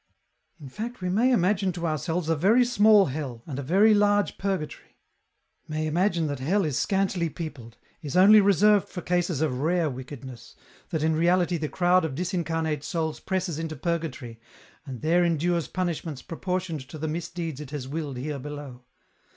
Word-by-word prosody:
" - - -47
In 145 - -10
fact 230 - -6
we 180 - -2
may 230 +8 +3
imagine 195 -3 +2
to 170 0 -4
ourselves 160 +2 -2
a 165 - +2
very 215 +11 +4
small 215 -3 +5
hell, 130 -6 -5
and 140 -3 -5
a - - -2
very 195 +10 +4
large 205 0 +2
purgatory; 190 -7 -4 0.7
may 155 0 -2
imagine 170 +1 +1
that 145 -3 -3
hell 185 +9 +1
is 150 -4 -2
scantily 190 -2 0
peopled, 140 -8 -8 0.2
is 145 0 -3
only 205 +3 +8
reserved 200 +1 +4
for 180 - -6
cases 175 -4 0
of 135 -5 0
rare 165 +1 +1
wickedness, 130 -2 -9 0.3
that 160 -4 -2
in 160 0 +2
reality 175 +1 +2
the 155 -2 -3
crowd 180 0 +3
of 155 -5 -3
disincarnate 165 -3 -2
souls 160 -1 -2
presses 185 -4 -2
into 160 -1 -4
Purgatory 155 -7 -4 0.5
and 130 -4 -7
there 170 +3 +3
endures 170 -2 0
punishments 170 -6 -3
proportioned 180 -1 -3
to - - -8
the 155 +1 -3
misdeeds 165 -2 -4
it 145 - -8
has 140 -3 -5
willed 145 -2 -4
here 140 +2 -4
below. 145 -2 -8
165 Hz, 175 wpm, -26 LUFS, 150-185 Hz, 0.7 s, only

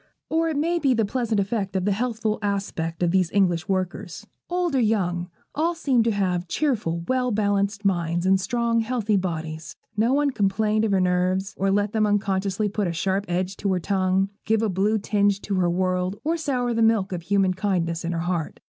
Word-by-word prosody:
Or 325 +1 +1
it 310 - -2
may 340 +4 +1
be 270 -5 +2
the 225 -2 +2
pleasant 230 -1 -1
effect 200 -1 -2
of 185 -1 0
the 205 - +2
healthful 220 0 -1
aspect 195 -5 -2
of 170 - +2
these 185 -2 +2
English 180 -2 +1
workers. 190 +1 -3 0.2
Old 355 -2 0
or 265 - +3
young, 180 -6 0 0.2
all 330 +3 0
seemed 265 -8 +2
to 230 - +3
have 185 -3 -1
cheerful, 205 - -1
well 255 -1 +1
balanced 205 -1 0
minds, 175 -2 0
in 190 0 +4
strong, 230 +4 0
healthy 225 -2 0
bodies. 160 -4 -3 0.2
No 220 +4 +2
one 285 0 +2
complained 215 0 +1
of 215 - 0
her 195 - +3
nerves, 185 +2 +1
or 195 +1 0
let 205 +1 +1
them 215 -1 +2
unconsciously 200 0 0
put 205 -1 -1
a 170 - -2
sharp 190 +4 -1
edge 180 +2 -1
to 200 - -1
her 180 - 0
tongue, 190 +1 +1
give 220 0 +1
a 220 - +1
blue 200 +4 +1
tinge 205 -1 +1
to 205 - -4
the 180 -2 +2
world, 185 +2 -1
or 320 +3 +1
sour 255 -7 -1
the 230 - 0
milk 220 -4 +3
of 180 -2 -3
human 195 +1 +2
kindness 180 -4 -1
in 170 - -2
her 165 -1 -2
heart. 175 -2 -2
200 Hz, 205 wpm, -24 LUFS, 185-225 Hz, 0.2 s, in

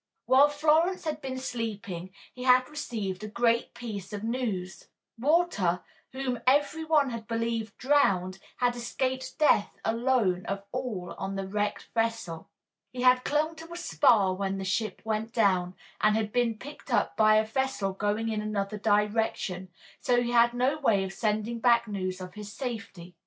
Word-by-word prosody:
While 275 +3 +6
Florence 315 +5 +2
had 305 -1 -3
been 260 -2 -4
sleeping 210 -8 -4 0.2
he 250 - -10
had 255 0 +5
received 215 -10 -4
a - - -4
great 235 +2 +1
piece 210 -5 -6
of 205 0 -5
news: 220 -6 -3 0.3
Walter, 255 - +2 0.3
whom 260 -2 -3
every 290 +4 +3
one 300 -4 +3
had 230 -1 -6
believed 230 -2 -2
drowned, 195 -10 +2 0.2
had 245 -1 +1
escaped 260 +2 -3
death 300 -9 +3
alone 225 -6 +1
of 195 0 -3
all 215 -9 -4
on 195 0 -3
the 195 -1 -3
wrecked 205 +1 -2
vessel. 225 -8 -2 0.4
He 250 0 -4
had 255 0 +5
clung 310 +2 0
to 325 +1 -11
a 340 - -6
spar 230 - +3
when 195 0 -2
the 190 - -4
ship 195 +1 -2
went 220 +1 -2
down, 185 -5 +2 0.3
and 215 - +4
had 215 -1 -1
been 235 -2 +1
picked 285 +2 -10
up 235 - +1
by 215 0 +5
a 215 0 +4
vessel 220 -4 -1
going 210 +3 -1
in 215 -1 -1
another 210 0 -3
direction, 205 -3 0 0.3
so 245 -1 +2
he 240 - -2
had 235 0 +5
had - - -18
no 260 +5 +1
way 215 -9 +3
of 190 0 -5
sending 215 +2 -1
back 235 -1 +4
news 185 -3 -3
of 180 -1 -8
his 210 0 -8
safety. 220 -8 -6
225 Hz, 170 wpm, -28 LUFS, 200-255 Hz, 0.4 s, While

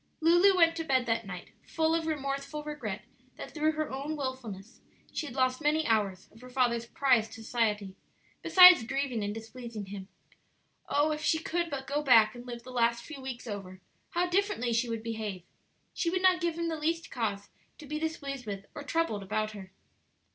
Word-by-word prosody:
Lulu 350 +4 +5
went 330 -1 +5
to 325 - -2
bed 260 -5 +2
that 225 -2 -1
night 180 -2 -7
full 320 0 0
of 330 -1 0
remorseful 275 0 -3
regret 235 -10 -5 0.3
that - - -9
through 310 0 +1
her 310 0 -3
own 280 +4 -3
wilfulness 245 -7 -6 0.3
she 310 - -3
had 255 - -9
lost 255 +1 +1
many 310 +1 +2
hours 205 -5 0
of 225 - -18
her 255 - -11
father's 240 -2 +1
prized 245 -5 +2
society, 215 -4 -1 0.5
besides 365 -5 +9
grieving 255 -2 -2
and 205 - -2
displeasing 225 0 -7
him. 195 -1 -8 0.8
Oh, 295 +2 +2
if 305 0 -3
she 320 - +2
could 340 +1 -2
but 275 -3 -4
go 285 +2 -1
back 225 -6 +6
and 245 0 -10
live 240 -1 -7
the 255 - -10
last 235 -1 +1
few 295 -1 -9
weeks 260 -2 -6
over, 195 -4 -7 0.3
how 355 +1 0
differently 355 - 0
she 230 +1 +1
would 225 -1 -3
behave! 215 -5 -4 0.5
She 335 - 0
would 370 +2 -1
not 365 -1 +5
give 340 -1 -1
him 335 0 -1
the 320 -1 -3
least 330 +2 -1
cause 205 -4 -3 0.3
to 310 - -11
be 305 +2 -4
displeased 280 -6 -4
with 200 -1 -5
or - - -7
troubled 290 -8 -1
about 215 +2 -2
her. 195 -3 -10
255 Hz, 190 wpm, -30 LUFS, 220-310 Hz, 0.8 s, besides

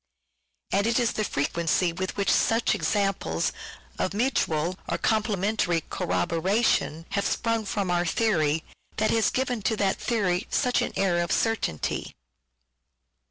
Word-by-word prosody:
And 200 +2 +2
it 230 - +2
is 240 -1 +2
the 215 - -2
frequency 170 +2 0
with 185 +3 -4
which 200 - +2
such 225 +1 +3
examples 195 - 0 0.5
of 190 - -1
mutual 185 - 0
or - - 0
complementary 205 -5 +1
corroboration 175 -1 0
have 200 0 0
sprung 230 -2 0
from 195 -2 -1
our 175 0 +1
theory, 160 -6 +1 0.3
that 215 0 +2
has 225 -2 +3
given 255 -3 -1
to 220 +3 0
that 200 -2 +1
theory 195 -5 0
such 250 -1 +1
an - - -2
air 180 -3 +2
of 170 - -2
certainty. 225 - -1
195 Hz, 135 wpm, -26 LUFS, 175-220 Hz, 0.5 s, such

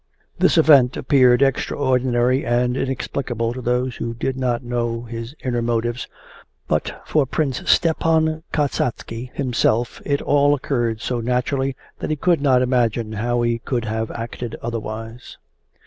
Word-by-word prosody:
This - - +4
event 130 -4 +6
appeared 130 -1 +4
extraordinary 130 -1 +1
and 125 +1 +1
inexplicable 130 -3 -2
to 130 - -6
those 125 +1 -1
who 115 0 -4
did 130 +2 -2
not 125 -2 -1
know 120 -1 -2
his 115 +3 -7
inner 120 -2 -1
motives, 120 +1 -1 0.6
but - - -1
for 150 -4 +1
Prince 135 -2 -1
Stepan 160 -1 +2
Kasatsky 125 -4 -2
himself 120 -3 0
it 140 -1 0
all 145 0 +3
occurred 120 -5 -1
so 125 -2 -2
naturally 125 +3 -1 0.2
that - - -4
he 155 - +1
could 170 +1 +1
not 130 -3 +4
imagine 120 -3 0
how 120 +3 -1
he 120 0 0
could 120 -1 -2
have 110 0 -2
acted 115 0 -6
otherwise. 115 +1 -6
125 Hz, 140 wpm, -21 LUFS, 115-135 Hz, 0.6 s, event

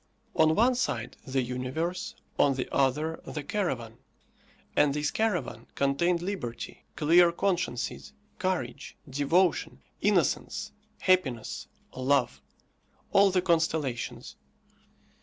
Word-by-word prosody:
On 160 0 +4
one 245 +4 +4
side, 125 - -2
the 130 0 +1
universe; 130 +9 -3 0.2
on 140 -2 +4
the 130 - -2
other, 150 +4 +1
the 150 - -5
caravan; 130 - -2 0.8
and 145 -1 +4
this 150 0 0
caravan 210 - -1
contained 170 +6 +1
liberty, 175 - -5
clear 170 +3 +5
consciences, 170 -9 -2 0.3
courage, 175 -9 -2
devotion, 145 +7 +1 0.2
innocence, - - +1 0.3
happiness, 150 - +1 0.3
love 130 +1 +1 0.7
all 200 0 +6
the 185 -1 +1
constellations. 160 -8 -1
155 Hz, 100 wpm, -28 LUFS, 130-180 Hz, 0.8 s, all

